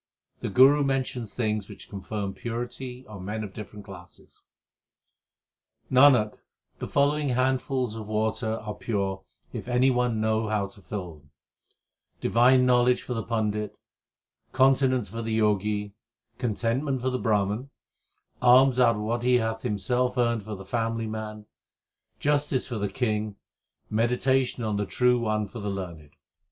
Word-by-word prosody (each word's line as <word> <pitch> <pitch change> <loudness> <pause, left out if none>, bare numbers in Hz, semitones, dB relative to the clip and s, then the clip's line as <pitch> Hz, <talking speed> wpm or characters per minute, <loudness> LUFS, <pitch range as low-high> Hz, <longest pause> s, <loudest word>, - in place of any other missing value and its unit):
The - - -3
Guru 135 +7 +6
mentions 130 -5 -2
things 110 -4 -2
which - - -11
confer 100 +1 -4
purity 125 +3 -6
on 100 -3 -9
men 105 +3 -3
of 100 -2 -7
different 105 -1 -9
classes: 90 -2 -14 1.5
Nanak, 130 -5 +5 0.4
the - - -4
following 145 +1 +2
handfuls 130 -1 0
2 110 - -6
of 105 - -9
water 110 +1 -1
are 110 -1 -5
pure 100 -4 -2 0.3
if - - -6
any 125 +2 +3
one 125 -3 +1
know 110 0 +1
how 105 -2 0
to 100 +1 -13
fill 90 -1 -6
them 75 -1 -27 0.9
Divine 125 +2 +4
knowledge 125 0 +3
for 125 - -4
the 115 - -2
Pandit, 105 -2 -2 0.8
continence 130 -3 +3
for 115 +5 -6
the 110 -1 -1
Jogi 105 -1 0 0.5
Contentment 125 +4 -1
for 130 +1 -1
the 130 - -1
Brahman, 105 +3 0 0.7
alms 130 +1 +6
out 120 -2 +5
of 105 - -4
what 115 +2 -1
he 125 +1 +3
hath 110 -2 0
himself 125 +3 -1
earned 120 -2 +2
for 105 +1 -6
the 95 0 -10
family 115 +2 -1
man, 110 -1 -6 0.7
3 - - -35
Justice 145 -2 +1
for 120 -4 -4
the 100 0 -1
king, 105 -2 -1 0.6
meditation 125 +3 +1
on 105 -2 -1
the 105 -1 -1
True 125 -1 +3
One 110 -2 -1
for 115 - -9
the 105 -1 -3
learned. 85 -7 -7
115 Hz, 150 wpm, -26 LUFS, 105-125 Hz, 1.5 s, Guru